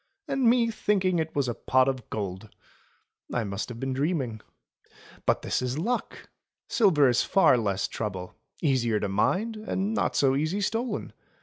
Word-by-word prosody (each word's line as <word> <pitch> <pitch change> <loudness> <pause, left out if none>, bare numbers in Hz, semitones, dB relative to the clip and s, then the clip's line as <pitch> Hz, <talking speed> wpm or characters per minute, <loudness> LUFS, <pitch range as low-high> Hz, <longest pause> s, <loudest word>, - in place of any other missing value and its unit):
"And 270 -3 0
me 235 -1 +3
thinking 190 -5 +1
it 160 0 -3
was 140 -3 +1
a 120 - -1
pot 130 +3 +2
of 130 -4 -3
gold! 100 0 -5 0.8
I 125 - 0
must 100 +2 -4
have 120 -1 -7
been 135 +1 -2
dreaming. 135 -6 -1 0.9
But - - +2
this - - 0
is 125 +2 -2
luck! 235 +10 -3 0.4
Silver 170 - +4
is 120 -1 +3
far 195 -9 +4
less 100 -5 0
trouble 95 -5 -5 0.2
— - - -31
easier 120 -7 +2
to 105 - -1
mind, 200 - 0
and 215 -1 -2
not - - 0
so 135 -1 +3
easy 155 +8 0
stolen. 225 +2 -2
135 Hz, 170 wpm, -27 LUFS, -, 0.9 s, Silver